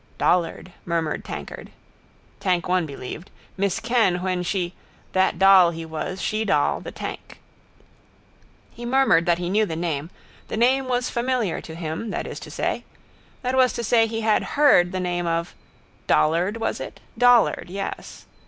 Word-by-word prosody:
—Dollard, 180 +1 0
murmured 165 -3 -2
tankard. - - -7 0.7
Tank 180 -3 0
one 180 -2 +1
believed: 140 +5 -8 0.3
miss 200 -1 0
Kenn 225 -7 +1
when 185 -1 -1
she: 180 0 -2 0.4
that 185 -2 +2
doll 190 -1 +7
he 165 -1 -6
was: 160 +4 -5
she 215 +4 -1
doll: 150 -9 +1
the - - -7
tank. - - -8 1.3
He 240 - -11
murmured 240 -9 +3
that 170 -1 +3
he 175 0 -3
knew 205 +4 +2
the 160 - -4
name. 160 -2 -3 0.4
The - - -4
name 260 +3 +3
was 250 0 -1
familiar 240 -5 -1
to 160 - -9
him, 165 +6 -4
that - - -3
is - - -6
to - - -10
say. - - -2 0.6
That 255 +1 0
was 255 -1 +4
to 235 - -4
say 225 0 +3
he 225 0 -3
had 220 +5 0
heard 180 -12 +5
the 185 - -3
name 175 -1 -2
of. 165 0 -1 0.5
Dollard, 175 +7 +2
was 225 - -2
it? - - -8 0.2
Dollard, 245 -1 +4
yes. 195 +2 -6
185 Hz, 160 wpm, -23 LUFS, 170-230 Hz, 1.3 s, doll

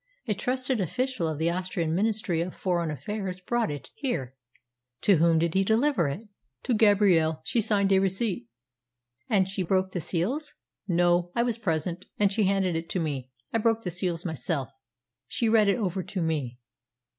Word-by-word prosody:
A 215 - +2
trusted 255 +2 -1
official 250 - -1
of 155 -2 -2
the 165 +2 +1
Austrian 175 -2 -2
Ministry 205 -3 0
of 175 +1 -4
Foreign 175 -3 0
Affairs 185 - -4
brought 235 +5 0
it 145 -2 -7
here. 155 - -3 0.7
To 200 -4 +5
whom 165 +1 +4
did 165 0 +1
he 195 - +3
deliver 225 - +2
it?" 185 +11 -5 0.4
"To 250 - 0
Gabrielle. 195 -8 +4
She 235 - +1
signed 200 -2 +2
a 190 - +6
receipt." 190 - -1 0.8
"And 195 -3 +3
she 190 0 -3
broke 190 +1 +1
the 180 - -3
seals?" 250 - -2 0.3
"No. 175 -1 +2
I 235 - +3
was 235 -2 -1
present, 175 -2 -2
and 200 -1 +3
she 210 0 +2
handed 190 -2 +1
it 165 0 -3
to 185 - -1
me. 140 -6 -3 0.2
I 225 - +2
broke 225 0 +1
the 180 - -2
seals 175 -1 -1
myself. 160 -4 -2 0.6
She 230 - 0
read 220 -2 +5
it 200 - +3
over 190 -4 -1
to 185 +1 -4
me." 145 -7 -2
185 Hz, 180 wpm, -27 LUFS, 165-215 Hz, 0.8 s, a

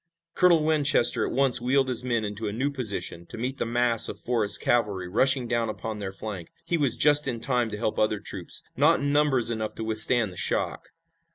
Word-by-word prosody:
Colonel 170 -4 +3
Winchester 150 -5 +2
at - - -6
once 130 -2 +5
wheeled 135 +2 +1
his 125 -1 +1
men 120 -3 -2
into 105 +1 -6
a - - -3
new 130 +7 -2
position 100 -9 -6
to - - -11
meet 130 +4 -5
the - - -2
mass 120 -1 +1
of - - -8
Forrest's 110 -4 +1
cavalry 105 -6 -1
rushing 130 +6 +2
down 115 -1 -2
upon 110 0 -6
their 100 -2 -6
flank. 95 -3 -8
He 175 - -1
was 140 -7 0
just 150 -1 +4
in 120 -3 -3
time 125 -1 0
to 105 - -7
help 110 0 -3
other 105 -1 0
troops, 95 -4 -5
not 150 +6 +3
in 140 0 -2
numbers 140 -6 +1
enough 110 -1 -3
to 115 - -6
withstand 110 -1 +4
the - - -15
shock. - - -3
120 Hz, 210 wpm, -25 LUFS, 110-135 Hz, -, once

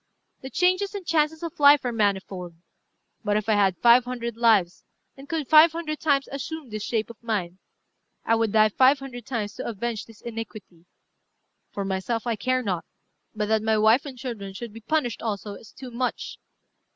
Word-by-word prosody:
The 265 - -7
changes 370 +5 +1
and 395 -3 -6
chances 320 0 +1
of 335 -1 -6
life 285 -2 +6
are 245 - 0
manifold. 190 -5 -1 0.7
But 205 -1 +1
if 215 0 -3
I 220 - +3
had 195 -3 +2
five 240 +1 +6
hundred 235 -2 -5
lives, 215 -7 +2 0.3
and 275 +1 -13
could 315 -4 -2
five 315 +1 +7
hundred 315 -2 -4
times 280 -3 +1
assume 280 -1 -6
this 215 -1 -4
shape 225 -1 -2
of 230 - -18
mine, 195 -6 -3 0.7
I - - +2
would 225 -2 +1
die 215 0 +5
five 260 +6 +4
hundred 255 -4 -9
times 215 -5 -3
to - - -5
avenge 230 0 -3
this 225 -2 -17
iniquity. 215 -7 -8 0.8
For 200 - -4
myself 195 +5 -2
I 235 -2 0
care 255 +4 0
not; 185 -6 -2 0.5
but 210 0 -1
that 220 -1 +2
my 220 0 +1
wife 220 +5 +4
and 265 -2 -9
children 220 -6 -6
should 230 +1 -7
be 225 - -10
punished 245 -1 -1
also 205 -2 -4
is 215 - -13
too 260 -2 -10
much. 250 +1 -3
230 Hz, 190 wpm, -25 LUFS, 210-270 Hz, 0.8 s, five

